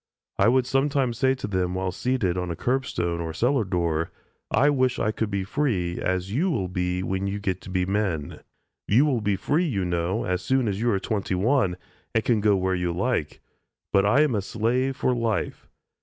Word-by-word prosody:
I 100 - +5
would 125 +1 +4
sometimes 135 -3 +1
say 130 0 +3
to - - -6
them, 95 -2 -1
while 95 0 -1
seated 105 -4 0
on 90 -1 -2
a 85 - -3
curbstone 85 -9 -1
or 80 - -3
a 80 - -6
cellar 125 - +2
door, 85 -4 -1 0.4
"I 145 +2 +4
wish 130 -3 +1
I 105 - +1
could 110 0 -2
be 100 -2 -1
free, 95 -7 -1
as 95 +1 -1
you 170 +10 +1
will 100 - -1
be 90 0 -1
when 95 +1 -2
you 100 +1 -2
get 95 -3 -2
to - - -10
be 90 -1 0
men. 95 -7 -2 0.5
You 125 +8 +5
will 130 -6 +1
be 100 -1 +1
free, 150 - +1
you 100 - -1
know, 90 +5 -1
as 90 0 -1
soon 130 +1 +1
as 100 0 -2
you 120 - +2
are 100 -4 +2
twenty 100 -1 -2
one, 100 -2 +2 0.4
and 115 - +3
can 115 -4 +2
go 105 -1 +4
where 95 0 0
you 90 -1 -1
like, 90 - -1 0.5
but 100 - +5
I 110 +8 +4
am 150 -4 +2
a 105 - +1
slave 120 +6 0
for 130 - +1
life. 115 -3 -2
100 Hz, 215 wpm, -25 LUFS, 90-125 Hz, 0.5 s, I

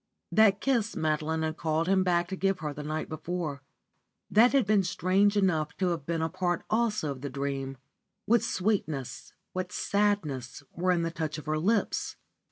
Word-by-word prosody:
That 210 -2 +5
kiss 235 -5 +1
Madeline 155 +1 0
had 155 0 -2
called 160 +1 0
him 190 0 +3
back 175 -1 +2
to 190 - -3
give 195 0 0
him 150 -2 -3
the 150 - -7
night 155 +1 -3
before; 155 -3 -4 0.7
that 230 +4 +6
had 275 -5 +3
been 205 -1 +4
strange 190 +3 +2
enough 160 -6 +1
to 185 -2 +1
have 165 -5 -3
been 165 -1 0
a - - +1
part 175 +1 -1
also 215 -8 +1
of 130 -2 -7
the 140 - -4
dream. 135 0 -3 0.5
What 235 0 +4
sweetness, 180 - -2 0.2
what 185 0 -3
sadness, 190 -14 -1
were 180 +1 0
in 170 -2 +1
the 165 - -1
touch 160 -2 -3
of 150 - -8
her 155 0 0
lips. 205 +5 0
175 Hz, 180 wpm, -29 LUFS, 155-200 Hz, 0.7 s, that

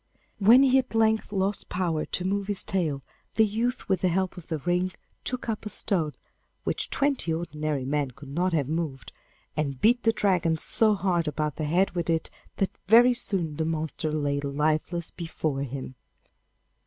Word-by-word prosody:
When 230 +6 +7
he 265 0 +5
at 255 -3 -4
length 220 -1 +2
lost 195 0 -1
power 170 -4 -1
to 180 - -3
move 200 +1 -1
his 205 -2 +2
tail, 160 -9 -1 0.3
the 220 - +5
youth 230 +4 -2
with 190 -3 +1
the 185 - +3
help 185 +1 0
of 180 - -11
the 160 - -2
ring 180 +4 0 0.3
took 255 -1 -1
up 220 -2 -2
a 210 - -5
stone 165 -8 0 0.5
which - - -1
twenty 275 - +1
ordinary 155 -4 -2
men 145 0 0
could 140 +3 -13
not 175 +6 0
have 150 -6 +1
moved, 155 -4 -3 0.4
and 140 -4 -2
beat 240 - +4
the 225 - +3
Dragon 180 -7 +1
so 215 +5 +2
hard 180 -4 0
about 150 0 -2
the 155 - -2
head 180 +6 +2
with 170 -2 -3
it 165 -1 0 0.2
that 195 - 0 0.2
very 240 +4 +7
soon 175 -10 -1
the 160 - 0
monster 160 -1 -2
lay 145 -2 0
lifeless 155 +4 -1
before 155 -4 -3
him. 135 -1 -5
170 Hz, 180 wpm, -27 LUFS, 155-200 Hz, 0.5 s, When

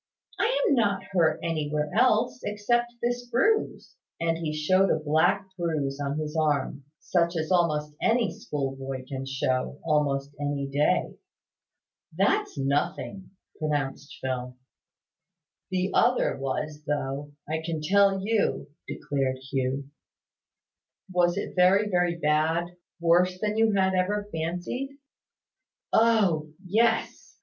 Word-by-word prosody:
"I - - +3 0.2
am - - +4
not 205 -6 +1
hurt 170 -4 +2
anywhere 150 -2 -1
else, 230 0 +3
except 240 +4 0
this 245 0 -1
bruise;" 430 - 0 0.2
and 165 0 +1
he 160 -2 -2
showed 185 +6 +2
a - - +3
black 160 +6 +2
bruise 155 -6 -2
on 140 0 -2
his 155 0 -4
arm, 145 -3 0
such 170 -1 +1
as 160 +2 -2
almost 150 -4 +1
any 230 -2 +2
schoolboy 135 -2 -4
can 135 0 -5
show, 135 0 -1
almost 145 -3 +1
any 145 -1 -1
day. 145 +2 +1 1.0
"That's - - +1
nothing," 140 +7 -2 0.3
pronounced 145 -2 -2
Phil. 125 -1 -4 1.1
"The 185 0 -1
other 250 - +3
was, 150 +3 -4
though, 145 0 -3
I 160 +1 -2
can 160 -1 -3
tell 195 +4 +3
you," 215 -8 0 0.2
declared 135 -2 -2
Hugh. 135 +1 -2 1.2
"Was 175 0 +2
it - - -4
very, 190 +3 +5
very 175 -1 +2
bad? 160 +2 +1 0.3
Worse 175 +2 +3
than 210 +1 -1
you 220 -1 +3
had 190 -1 +2
ever 205 +3 0
fancied?" 180 +12 -3 1.0
"Oh! 200 -9 +3 0.2
Yes. 225 +4 0
165 Hz, 120 wpm, -27 LUFS, 145-195 Hz, 1.2 s, very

